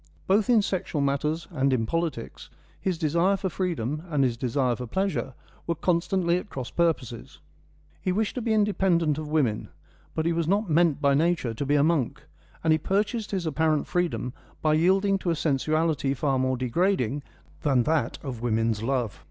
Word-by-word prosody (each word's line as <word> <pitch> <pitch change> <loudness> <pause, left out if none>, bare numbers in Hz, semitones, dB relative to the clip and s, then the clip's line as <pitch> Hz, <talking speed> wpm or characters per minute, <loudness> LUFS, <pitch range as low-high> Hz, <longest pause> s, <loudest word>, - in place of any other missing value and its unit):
Both 205 +4 +2
in 230 -4 +5
sexual 185 -5 -2
matters 145 +4 0
and 135 -4 +1
in 120 -3 +1
politics, 165 - -3 0.3
his 185 -3 -1
desire 170 +5 +2
for 190 -1 -2
freedom 155 -6 -2
and 145 -4 +2
his 125 -3 +1
desire 125 +1 0
for 125 0 -6
pleasure 135 - -2 0.3
were 170 - 0
constantly 175 +1 +1
at 205 - -11
cross 130 -3 -6
purposes. 145 -9 -1 0.6
He 185 - 0
wished 210 +3 0
to 250 - -3
be 225 0 -1
independent 190 -7 +2
of 155 - -5
women; 140 -9 0 0.5
but 160 - -1
he 170 - +2
was 165 -1 -1
not 200 +4 +1
meant 160 -2 +3
by 140 -1 +4
nature 155 -5 +1
to 125 +6 -3
be 145 - +3
a 145 - +4
monk, 155 -6 0 0.4
and 160 -1 +4
he 155 - +2
purchased 210 +6 -1
his 190 -4 -2
apparent 155 -1 +1
freedom 175 -8 -1 0.3
by 155 -1 +2
yielding 195 +5 +3
to 180 - -2
a 165 - +2
sensuality 155 -1 0
far 135 0 0
more 130 0 +1
degrading 135 - 0 0.4
than 135 -4 +3
that 150 -5 0
of 125 -5 -5
women's 115 -2 0
love. 120 -3 -1
155 Hz, 180 wpm, -26 LUFS, 130-180 Hz, 0.6 s, in